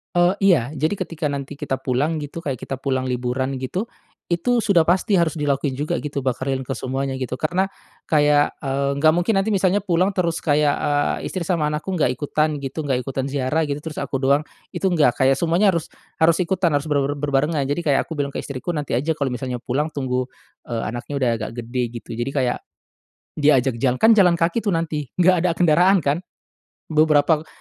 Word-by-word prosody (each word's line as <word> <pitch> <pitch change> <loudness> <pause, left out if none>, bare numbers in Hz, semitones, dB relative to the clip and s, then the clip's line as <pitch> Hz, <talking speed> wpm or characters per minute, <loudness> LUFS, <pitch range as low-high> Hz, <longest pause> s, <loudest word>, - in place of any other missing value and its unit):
Eee, 175 +2 +4
iya 145 -8 +3
jadi 155 +6 -1
ketika 165 -4 -3
nanti 140 0 -5
kita 145 -3 -1
pulang 135 +5 -1
gitu 145 +3 -7
kayak 140 -5 -3
kita 135 - -5
pulang 130 -1 -1
liburan 130 +1 -2
gitu. 130 +10 -2 0.4
Itu 175 +9 +1
sudah 200 -7 +4
pasti 190 +4 +2
harus 165 -1 0
dilakuin 140 -2 -1
juga 150 +2 -2
gitu 150 -1 -6
bakar 130 +1 -1
lilin 130 -1 -2
ke 135 - -3
semuanya 135 +1 -3
gitu, 130 -1 -4
karena, 180 +6 0 0.4
kayak, 145 -1 +3
eee, 140 0 -1
nggak 155 +2 +4
mungkin 175 +5 +1
nanti 200 +3 +1
misalnya 195 +1 +1
pulang 180 +2 +2
terus 170 -2 0
kayak, 150 -1 +2
eee, 145 0 -1
istri 185 -3 -4
sama 160 -4 +1
anakku 150 +5 -3
nggak 160 -8 +2
ikutan 150 +2 0
gitu, 140 +2 -5
nggak 130 -4 -1
ikutan 135 0 -3
ziarah 140 +3 0
gitu, 140 - -1
terus 160 - -5
aku 140 0 -2
doang, 140 +2 +2 0.3
itu 190 - 0
nggak. 150 -9 +3
Kayak 135 0 +4
semuanya 170 +6 +3
harus 170 -3 0 0.3
harus 165 +2 +3
ikutan, 180 -2 +1
harus 145 +2 -1
ber 145 -2 +2
ber 145 - -1
berbarengan. 145 +1 +1
Jadi 170 +4 -2
kayak 140 -3 +3
aku 160 - -5
bilang 140 -1 -2
ke - - -3
istriku, 140 +5 -5
nanti 145 -6 -1
aja 155 +5 0
kalo 140 -3 -2
misalnya 125 0 -4
pulang 150 +6 -2
tunggu, 130 -2 -1 0.4
eee, 115 -1 -3
anaknya 120 +5 -6
udah 125 - +3
agak 110 0 -5
gede, 125 +2 -2 0.2
gitu. - - -26
Jadi 120 +3 -2
kayak, 130 -3 0 0.8
diajak 135 -5 +3
jalan, 130 -1 +2
kan 225 - +5
jalan 180 -5 +5
kaki 170 +7 +1
tuh 210 - -1
nanti 155 -4 -3
nggak 185 +1 +5
ada 180 - +2
kendaraan 180 +3 +5
kan. 145 +5 +1 0.7
Beberapa, 155 0 +3
145 Hz, 200 wpm, -22 LUFS, 135-170 Hz, 0.8 s, kan